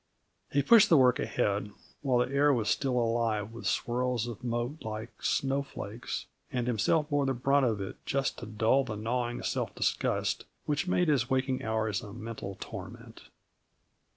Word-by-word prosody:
He 140 0 +2
pushed 215 - +7
the 165 - +7
work 125 -2 +5
ahead 105 -2 0 0.3
while 130 -4 +2
the 135 - -8
air 145 +1 +5
was 115 -6 +1
still 135 -2 +1
alive 115 -3 0
with 115 -3 -6
swirls 125 0 0
of 120 0 -7
mote 120 +5 -2
like 110 +1 -5
snowflakes, 135 -5 -2 0.3
and 125 -2 -1
himself 125 +6 +2
bore 145 -1 +2
the 135 - +1
brunt 135 +2 +3
of 110 -3 0
it 95 - -7
just 135 0 -1
to 120 - -7
dull 110 +5 +2
that 110 -3 -4
gnawing 120 +2 -2
self - - -2
disgust - - 0 0.2
which 150 +4 0
made 180 -1 +2
his 135 -5 +2
waking 130 -1 0
hours 110 -2 0
a 100 - -9
mental 110 -4 -6
torment. - - -9
120 Hz, 165 wpm, -30 LUFS, 110-135 Hz, 0.3 s, pushed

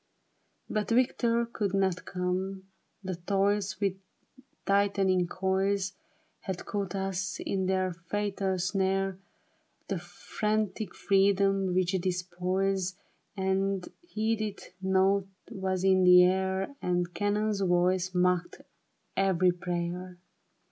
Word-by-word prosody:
But 215 -1 -1
V^ictor 235 -1 +2
could 200 -2 -1
not 190 -2 0
come, 185 +1 -2 0.4
the 185 -2 -4
toils 200 +2 0
With 195 -2 0 0.7
tightening 195 -2 +2
coils 190 +1 0 0.5
Had 190 -2 -5
caught 200 -1 -3
us 190 -1 -2
in 190 -1 -1
their 185 -1 +1
fatal 195 +2 -2
snare; 190 0 0 0.7
The - - -1
frantic 215 -2 -2
freedom 195 -1 +2
which 185 -1 +2
despoils 185 +1 -1 0.4
And 190 0 0
heedeth 220 - -3
nought, 190 +1 +2 0.2
was 190 -1 -2
in 190 -1 +4
the 180 0 +8
air. 190 +6 0
And 175 -1 0
cannon's 205 +2 0
voice 180 0 +2
mocked 180 -1 +1 0.5
every 185 -2 +3
prayer. 175 0 -4
190 Hz, 100 wpm, -29 LUFS, 180-195 Hz, 0.7 s, the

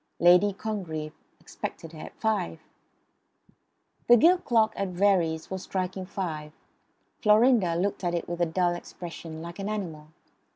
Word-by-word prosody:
Lady 180 +4 +6
Congreve 180 -7 -4 0.3
expected 165 - -7
her 160 - -11
at - - -10
five. 205 -7 -1 1.5
The 240 - +8
gilt 350 +8 +4
clock 225 -2 +3
at 195 - -1
Verrey's 175 -4 +1
was 190 -1 -3
striking 185 0 -3
five. 155 -6 -4 0.7
Florinda 215 -4 +4
looked 195 +3 -1
at 175 -1 0
it 170 - -3
with 175 0 -4
a 170 - +3
dull 175 +1 +1
expression, 165 -2 -8
like 170 +3 -8
an 200 +1 -3
animal. 170 -8 -5
180 Hz, 140 wpm, -27 LUFS, 165-205 Hz, 1.5 s, The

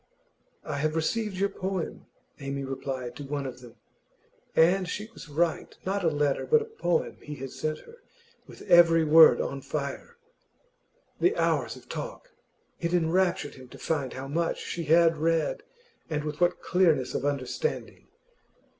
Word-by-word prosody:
'I 145 - -3
have 155 +2 0
received 205 +5 -1
your 200 +1 +1
poem,' 190 -3 -4 0.3
Amy 140 0 -4
replied 130 -2 -5
to 145 - -7
one 140 0 -3
of 125 -1 -7
them. 120 -2 -13 0.8
And 180 +3 +4
she 210 +3 -4
was 165 - -11
right; 165 +2 -1
not 195 +1 -1
a - - +3
letter, 145 -2 0
but 460 - +5
a - - -9
poem 470 +2 -1
he 150 - -7
had 135 -1 -7
sent 155 0 -3
her, 465 +1 -16 0.5
with - - -12
every 165 -1 +6
word 160 +1 +8
on 140 0 -3
fire. 150 - -5 1.0
The 385 +6 +2
hours - - +1
of - - -15
talk! - - -7 0.5
It 170 +1 0
enraptured 175 -2 +1
him 130 -1 -13
to - - -13
find 140 -6 -2
how 130 +1 -6
much 165 +4 -1
she 170 -1 -5
had 165 +1 +5
read, 160 0 0 0.5
and 150 -2 -2
with 150 +2 -5
what 175 - +2
clearness 165 -8 +2
of - - -2
understanding. 145 - -3
160 Hz, 160 wpm, -28 LUFS, 140-180 Hz, 1.0 s, word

